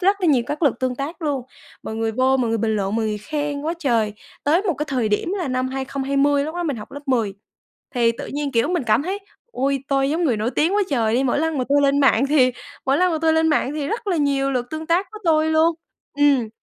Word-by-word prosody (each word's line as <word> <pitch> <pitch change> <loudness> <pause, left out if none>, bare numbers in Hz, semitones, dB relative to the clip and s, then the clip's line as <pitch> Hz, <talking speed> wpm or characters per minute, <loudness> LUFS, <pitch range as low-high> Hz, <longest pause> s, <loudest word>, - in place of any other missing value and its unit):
rất 395 +2 +2
là 360 - +1
nhiều 265 -6 +4
các 300 +3 -4
lượt 275 -5 +3
tương 255 -1 0
tác 300 +5 -5
luôn. 285 -5 -1 0.4
Mọi 220 - -5
người 225 0 -1
vô 260 +3 +2
mọi 245 -3 0
người 225 - 0
bình 220 0 0
luận, 200 +2 -1
mọi 225 - 0
người 210 -1 -2
khen 290 +5 -3
quá 325 +3 -1
trời. 230 -8 +1 0.3
Tới 325 +7 +3
một 360 -7 0
cái 300 +3 -3
thời 250 -6 0
điểm 210 - 0
là 340 -7 -2
năm 255 0 -1
2020 275 +2 0
lúc 315 - -5
đó 350 - -2
mình 290 -7 -2
học 210 - -10
lớp 285 - -7
10 225 -7 0 0.6
thì 230 -1 +3
tự - - -7
nhiên, 285 -1 -3
kiểu, 230 +4 +2
mình 350 -3 0
cảm 230 +5 +3
thấy, 380 +4 -3 0.3
ôi, 270 +1 -1
tôi 275 0 +1
giống 335 +2 0
người 250 -7 +2
nổi 215 +3 -1
tiếng 325 +9 +1
quá 415 - +3
trời 225 -4 +1
đi, 260 +3 +2
mỗi 265 - +1
lần 320 -3 -1
mà 255 - 0
tôi 285 +1 +3
lên 280 0 +3
mạng 270 -1 +4
thì 260 -4 +4 0.3
mỗi 270 +3 +3
lần 365 -1 +3
mà 315 - 0
tôi 320 0 +4
lên 320 0 +3
mạng 290 -2 +1
thì 290 -1 -3
rất 450 -1 -4
là 355 - +1
nhiều 275 -2 +1
lượt 245 -1 -1
tương 315 0 -5
tác 350 +4 +2
của 430 - -8
tôi 315 -1 +3
luôn. 320 +1 +3 0.4
Ừm, 275 -6 +3
275 Hz, 265 wpm, -21 LUFS, 250-315 Hz, 0.6 s, nhiều